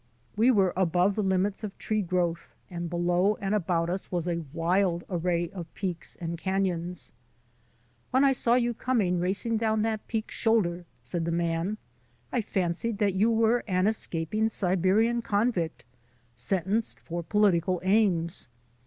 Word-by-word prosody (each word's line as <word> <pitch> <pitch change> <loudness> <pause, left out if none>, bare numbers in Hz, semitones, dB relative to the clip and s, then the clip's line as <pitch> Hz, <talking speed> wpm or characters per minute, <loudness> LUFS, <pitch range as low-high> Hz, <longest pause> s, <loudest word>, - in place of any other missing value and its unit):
We 225 +4 +4
were 195 -7 +3
above 180 +1 +2
the 215 - -1
limits 195 +1 0
of 205 -2 -6
tree 215 -1 -1
growth 175 -2 -1 0.2
and 170 -1 -4
below 175 +4 +1
and 195 0 -1
about 170 -4 +1
us 185 +2 -3
was 175 -1 -1
a 170 -1 -1
wild 175 +2 +1
array 175 -1 0
of 175 -4 -8
peaks 180 -4 -3
and 170 -1 -4
canons. 180 -2 -2 1.0
"When 260 +2 +3
I 275 - +5
saw 240 -2 +3
you 240 -1 +1
come 250 +2 0 0.2
racing 200 +6 0
down 220 -1 +1
that 220 -1 -2
peak 220 -1 -3
shoulder," 180 -6 +1 0.2
said 165 +7 -2
the 170 - -1
man, 170 +4 -1 0.5
"I - - +1
fancied 190 +3 -2
that 205 -2 +1
you 205 +5 +3
were 230 +1 +3
an 185 -1 +1
escaping 215 0 0
Siberian 200 +5 +2
convict, 205 -7 -1 0.5
sentenced 190 - 0
for 170 +1 -5
politi 200 -2 +3
cal 180 0 -1
aims. 185 - +2
190 Hz, 155 wpm, -28 LUFS, 170-215 Hz, 1.0 s, I